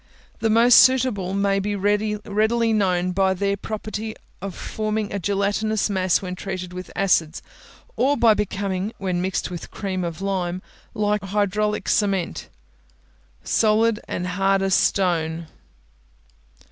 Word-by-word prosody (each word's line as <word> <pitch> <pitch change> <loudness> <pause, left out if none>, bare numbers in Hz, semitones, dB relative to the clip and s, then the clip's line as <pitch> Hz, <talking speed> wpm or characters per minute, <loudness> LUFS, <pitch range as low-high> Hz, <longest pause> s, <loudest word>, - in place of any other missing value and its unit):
The 225 - +1
most 230 +2 +7
suitable 240 -8 +3
may 200 0 +1
be 205 +1 -2
readily 210 +3 +1
known 185 -3 +1
by 190 0 +2
their 200 +1 0
property 215 +1 -5 0.3
of 195 -1 -5
forming 215 -1 -3
a 200 - -2
gelatinous 205 +3 0
mass 185 -1 +1
when 180 -1 -4
treated 185 -1 -6
with 185 0 -7
acids, 170 -5 +1 0.5
or 285 +2 +2
by 230 -3 +5
becoming, 200 0 -2
when 185 -2 -2
mixed 185 -1 -2
with 175 - -7
cream 190 -3 -3
of 170 -2 -4
lime, 185 -2 -2 0.3
like 210 -1 0
hydraulic 210 +1 -1
cement, 195 -4 0 0.9
solid 215 - +2
and 180 - -3
hard 195 +1 +1
as 195 0 +1
stone. 170 -4 +1
200 Hz, 130 wpm, -23 LUFS, 185-215 Hz, 0.9 s, most